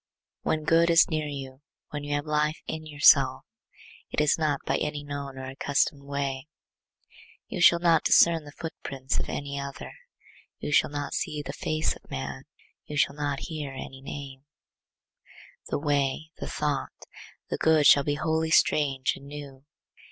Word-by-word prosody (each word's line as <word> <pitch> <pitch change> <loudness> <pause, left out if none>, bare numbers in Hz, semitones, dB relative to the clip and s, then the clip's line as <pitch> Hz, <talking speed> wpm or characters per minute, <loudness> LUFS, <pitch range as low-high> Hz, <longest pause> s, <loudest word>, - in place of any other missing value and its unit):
When 155 -1 -1
good 165 +2 +4
is 165 +1 +5
near 155 -1 -1
you, 135 -2 -7 0.3
when 145 -1 -5
you 145 0 -2
have 145 +1 -2
life 150 0 0
in 155 0 -5
yourself, 145 -3 +5 0.7
it - - -2
is 150 -1 +4
not 150 -3 0
by - - +1
any 150 -1 -3
known 140 -2 -6
or 130 - -6
accustomed 140 +2 0
way; 140 -1 -3 1.0
you 195 -7 -4
shall 175 0 +7
not 170 -1 +3
discern 165 -2 +5
the 145 - -11
footprints 140 -4 -4
of - - -4
any 140 0 -4
other; 140 0 -7 0.7
you - - -5
shall - - +4
not 145 0 -4
see 150 -1 -2
the 140 - -6
face 155 +1 -1
of - - -19
man; 65 0 -5 0.4
you 150 - -5
shall 140 - +3
not 145 -2 -2
hear 150 -5 -5
any 135 0 -8
name;—the 140 0 -8 1.3
way, 145 +1 0
the - - -6
thought, 145 -3 -3 0.5
the - - 0
good 160 -2 +4
shall 140 - +7
be 145 +1 0
wholly 160 +1 0
strange 140 -4 +3
and 140 - -13
new. 140 -2 -9
145 Hz, 160 wpm, -27 LUFS, 140-155 Hz, 1.3 s, shall